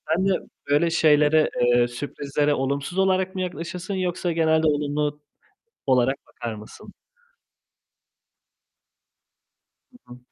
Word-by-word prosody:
Sen 190 +3 +1
de 190 - -1 0.2
böyle 150 +4 +3
şeylere, 155 -1 +4
eee, 120 0 +4
sürprizlere 145 +3 -2
olumsuz 140 +5 -2
olarak 190 0 +1
mı 185 - -2
yaklaşırsın 175 +2 -5
yoksa 180 -1 -1
genelde 160 -1 +2
olumlu 150 0 -1 0.7
olarak 130 0 +3
bakar 115 -2 -6
mısın? 105 0 -12 3.0
Hı - - -17 0.2
hı. - - -15
150 Hz, 105 wpm, -24 LUFS, 140-175 Hz, 3.0 s, şeylere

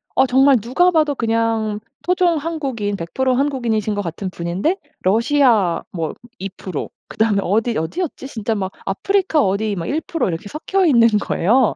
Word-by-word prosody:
어 265 - +5
정말 265 +1 +5
누가 270 - +2
봐도 310 -3 +2
그냥 225 -2 0 0.2
토종 360 -2 +2
한국인 275 -10 -3
100% 250 +9 -1
한국인이신 235 -7 0
것 205 - -1
같은 185 +1 -4
분인데 180 - -1 0.2
러시아 230 - +3
뭐 165 -4 -3 0.3
2% 190 -4 -5 0.2
그다음에 220 -2 +1
어디 225 +5 +1
어디였지? 270 - -3
진짜 225 -4 -3
막 190 -2 -3
아프리카 360 - +1
어디 200 +2 0
막 165 -3 -4
1% 320 +2 -1
이렇게 165 +4 -4
섞여있는 305 - +3
거예요. 230 +7 +2
230 Hz, 300 characters per minute, -20 LUFS, 200-290 Hz, 0.3 s, 어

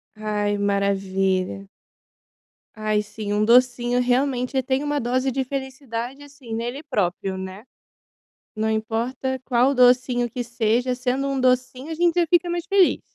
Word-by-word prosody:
Ai, 210 -1 -1
maravilha. 195 -1 0 1.1
Ai 215 -1 0
sim, 210 0 -5
um 210 +1 +2
docinho, 245 +1 +3
realmente, 255 +1 +1
tem 260 +2 0
uma 295 0 -1
dose 255 +2 0
de 265 +1 -1
felicidade, 265 -1 -5
assim, 275 -5 -9
nele 240 +5 -4
próprio, 190 - -2
né. 190 +4 -7 0.9
Não 220 0 0
importa 235 +4 -2
qual 255 +2 +2
docinho 250 -1 +3
que 245 +2 -4
seja, 235 +1 0
sendo 255 +2 -1
um 275 -1 -1
docinho, 255 +2 0
a 320 - -3
gente 345 0 +2
fica 350 +1 +3
mais 345 0 -2
feliz. 390 -3 +3
245 Hz, 135 wpm, -23 LUFS, 215-265 Hz, 1.1 s, docinho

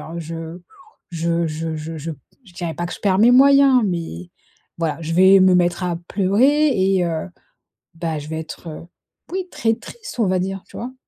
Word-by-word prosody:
alors 170 +2 -7
je 165 +1 -7 0.5
je, 170 0 -2
heu, 170 0 +1
je 160 +1 -4
je 160 +1 -6
je 160 +2 -5 0.3
je 190 - -18
dirais 175 -3 -4
pas 175 - -4
que 175 - -7
je - - -13
perds 190 -2 +2
mes 230 +3 +6
moyens, 275 -1 +6
mais, 165 - -5 0.5
voilà 160 -3 -2
je 165 +1 -4
vais 190 +2 +6
me 185 -1 +5
mettre 175 0 +1
à 175 -1 -1
pleurer 255 +11 +3
et 190 -6 +2
heu, 165 0 -3 0.7
bah, 165 -2 -3
je 150 - -8
vais 160 0 -4
être, 160 0 -9 0.5
oui, 375 0 -3
très 225 0 0
triste, 420 - -11
on 220 - +3
va 185 0 +1
dire. 195 +1 -4
Tu - - -13
vois? 245 +2 -6
175 Hz, 200 wpm, -20 LUFS, 165-200 Hz, 0.7 s, mes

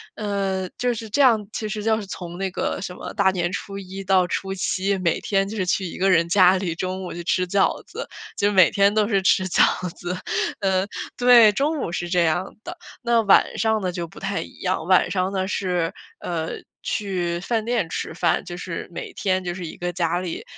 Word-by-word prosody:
呃， 195 -3 -2
就 245 +3 +1
是 225 -1 -7
这 285 - +1
样 225 -6 +4
其 215 -1 -3
实 215 0 -3
就 220 0 +2
是 - - -7
从 175 -2 -7
那 195 0 -2
个 185 - -2
什 180 -2 -5
么 - - -8
大 200 -2 +3
年 175 -2 -1
初 200 0 -5
一 195 +1 -7
到 185 -2 +3
初 195 +2 -3
七， 195 +1 0
每 170 -3 0
天 195 -1 +1
就 215 - -6
是 190 -3 -1
去 190 +1 0
一 170 - -6
个 195 +1 +2
人 170 -1 +4
家 185 +1 +5
里 180 -3 -2
中 185 +2 -3
午 - - -6
去 175 0 -6
吃 180 +1 +1
饺 195 +2 +1
子， - - -7 0.3
就 205 +1 +2
每 185 -4 +6
天 200 0 +3
都 215 -1 +2
是 200 -4 +2
吃 185 0 +3
饺 180 - +4 0.3
子。 180 +1 -4 0.4
嗯 190 -1 +1 0.3
对， 245 -3 +7
中 290 +8 0
午 170 - -3
是 175 -1 -3
这 175 -1 +3
样 170 +3 -1
的， - - -7 0.3
那 235 -1 +3
晚 200 - +4
上 220 -1 +2
呢， 180 -1 -1
就 170 -1 -4
不 - - -13
太 195 0 -2
一 - - -10
样， 180 -4 -1
晚 185 -1 +4
上 185 0 0
呢 190 -1 -1
是， 180 -4 -1 0.3
呃， 165 -2 -3 0.3
去 180 -5 -2
饭 225 +2 -1
店 235 -7 0
吃 160 - -4
饭。 - - +1
就 175 -1 -7
是 170 -1 -5
每 - - -7
天 185 -1 0
就 175 - -3
是 180 -1 -6
一 - - -8
个 175 0 -3
家 175 0 0
里， 180 -2 -5
190 Hz, 240 characters per minute, -23 LUFS, 175-205 Hz, 0.4 s, 对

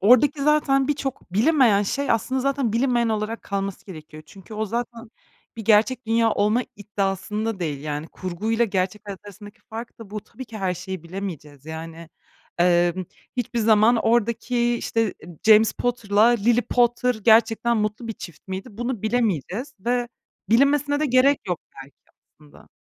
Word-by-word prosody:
oradaki 265 +7 +4
zaten 280 -2 +3
birçok 270 -10 -3
bilinmeyen 230 -3 +4
şey 280 +7 -2
aslında 260 +4 0
zaten 275 -4 0
bilinmeyen 240 0 +2
olarak 220 +1 -2
kalması 195 -1 -4
gerekiyor. 155 -4 -11
Çünkü 195 +6 -13
o 215 +1 -1
zaten 235 +1 -5 0.5
bir 225 - -6
gerçek 225 +3 +3
dünya 225 0 +3
olma 210 +4 +2
iddiasında 205 +1 -3
değil. 145 -5 -3
Yani 150 0 -4
kurguyla 215 +6 -1
gerçek 195 -1 -2
hayat 200 -2 -7
arasındaki 205 0 -12
fark 230 +2 -8
da 220 -3 -11
bu. 215 - -4
Tabii 255 +5 -11
ki 225 -2 -9
her 185 -2 -1
şeyi 185 -1 -6
bilemeyeceğiz. 165 -6 -7
Yani, 165 +1 -8 0.5
emm, 175 +1 +3 0.3
hiçbir 240 -1 -2
zaman 220 +1 +4
oradaki, 235 +1 +1
işte, 225 -3 -1 0.3
James 220 0 +6
Potter'la 215 -4 +1
Lily 240 0 +3
Potter 245 +1 +2
gerçekten 225 +2 +3
mutlu 215 +2 -2
bir - - -2
çift 175 -4 -12
miydi, 190 0 -5
bunu 240 0 -4
bilemeyeceğiz 225 - -1
ve 245 +2 0 0.4
bilinmesine 285 +4 +3
de 305 - +2
gerek 265 +2 +4
yok 180 -3 -2 0.2
belki 140 - -22 0.4
aslında. 150 -1 -18
220 Hz, 150 wpm, -23 LUFS, 195-240 Hz, 0.5 s, James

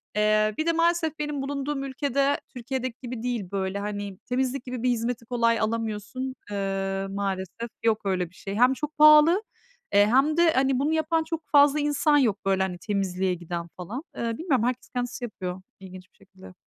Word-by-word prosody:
Eee, 215 0 +3
bir 315 - -1
de 335 - +3
maalesef 335 -2 +1
benim 295 -2 -2
bulunduğum 275 0 -3
ülke 275 0 -3
de 280 +1 +2
Türkiye'deki 255 -1 -4
gibi 245 -2 -6
değil 235 -7 -3
böyle 195 0 -2
hani 205 -1 -5
temizlik 255 +1 -1
gibi 250 -2 -5
bir 250 - +3
hizmeti 235 0 -1
kolay 230 -1 +1
alamıyorsun, 225 +3 -3 0.2
ııı, 195 -1 -2
maalesef 195 +3 -4
yok 220 -1 +2
öyle 185 -3 0
bir 185 - -24
şey. 195 0 -6
Hem 250 +3 +5
çok 300 +2 -5
pahalı, 305 +1 +8 0.6
ııı, 205 0 +7
hem 275 +7 +3
de 340 -1 +5
hani 265 -1 +2
bunu 295 +3 +1
yapan 320 +1 +1
çok 320 0 -4
fazla 290 0 +6
insan 295 0 +2
yok 235 -8 +2
böyle 195 -1 +2
hani 180 -2 -3
temizliğe 190 -1 -1
giden 170 0 -5
falan. 205 +9 -5 0.2
Iıı, 230 -1 -2
bilmiyorum 275 -9 +1
herkes 250 0 -2
kendisi 245 0 -4
yapıyor 185 -4 -6 0.2
ilginç 185 -1 -11
bir - - -33
şekilde. 190 -1 -15
235 Hz, 185 wpm, -26 LUFS, 195-275 Hz, 0.6 s, pahalı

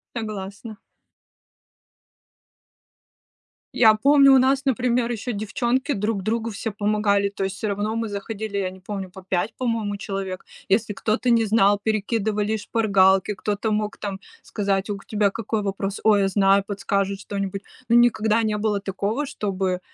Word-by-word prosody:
Согласна. 215 0 -6 3.0
Я 220 -3 +6
помню, 275 +3 +6
у - - +7
нас, 270 +1 +2
например, 250 -2 +1
еще 240 +1 -3
девчонки 235 +6 -1
друг 210 -2 -2
другу 230 +2 -1
все 220 +2 -4
помогали, 205 -1 +1
то 200 -1 -5
есть 190 0 -3
всё 220 - -3
равно 205 +2 -2
мы 230 0 -2
заходили, 205 0 -5
я 190 -2 -1
не 190 0 -13
помню, 195 0 -6
по 190 +1 -12
5, 185 +4 0
по-моему, 225 -5 -2
человек. 195 -3 -5 0.2
Если 210 +2 +1
кто-то 220 +5 -1
не 230 -1 +4
знал, 205 -1 +4
перекидывали 215 0 0
шпаргалки, 195 -3 +2
кто-то 205 +3 -2
мог 210 0 -1
там 200 -2 -5 0.2
сказать: 195 -1 -2
"У 205 - -2
к 195 - -16
тебя 210 -2 +1
какой 220 0 -2
вопрос?". 195 0 -3
"Ой, 210 -2 +5
я 195 - +2
знаю",- 195 0 +3
подскажут 200 -1 -1
что-нибудь. 195 -1 -4 0.3
Но 235 - +4
никогда 230 -2 +4
не 215 -1 0
было 210 -1 0
такого, 200 +7 -2
чтобы 195 -8 -2
210 Hz, 155 wpm, -23 LUFS, 195-225 Hz, 3.0 s, у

